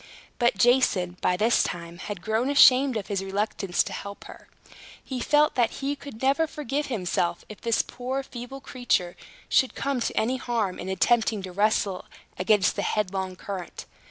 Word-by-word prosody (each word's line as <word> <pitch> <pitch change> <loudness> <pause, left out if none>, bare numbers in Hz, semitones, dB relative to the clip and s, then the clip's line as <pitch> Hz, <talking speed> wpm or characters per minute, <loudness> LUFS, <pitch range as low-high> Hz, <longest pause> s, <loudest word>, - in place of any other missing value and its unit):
But 240 -4 +2
Jason, 190 -6 +3
by 180 - +2
this 225 +5 +3
time, 170 0 -4
had 200 -2 -6
grown 220 +4 0
ashamed 265 -2 +6
of 205 - -4
his 195 -2 -2
reluctance 195 -1 0
to - - -7
help 200 0 -7
her. - - -13 0.6
He 260 -2 -5
felt 300 +4 +3
that 240 -2 +1
he 280 +1 -2
could 275 -4 -10
never 280 +5 +3
forgive 295 -1 -3
himself, 180 -7 -1
if 215 - -10
this 230 -1 +1
poor 260 +2 -4
feeble 255 +1 -8
creature 230 -10 -1 0.3
should 260 - +2
come 275 -2 -1
to 235 - -2
any 250 +4 0
harm 230 -7 -2
in - - -5
attempting 220 +2 +2
to 185 - -6
wrestle 200 -1 +1 0.3
against 190 0 +3
the - - -1
headlong 190 -2 -2
current. 185 -1 -7
220 Hz, 170 wpm, -26 LUFS, 190-260 Hz, 0.6 s, ashamed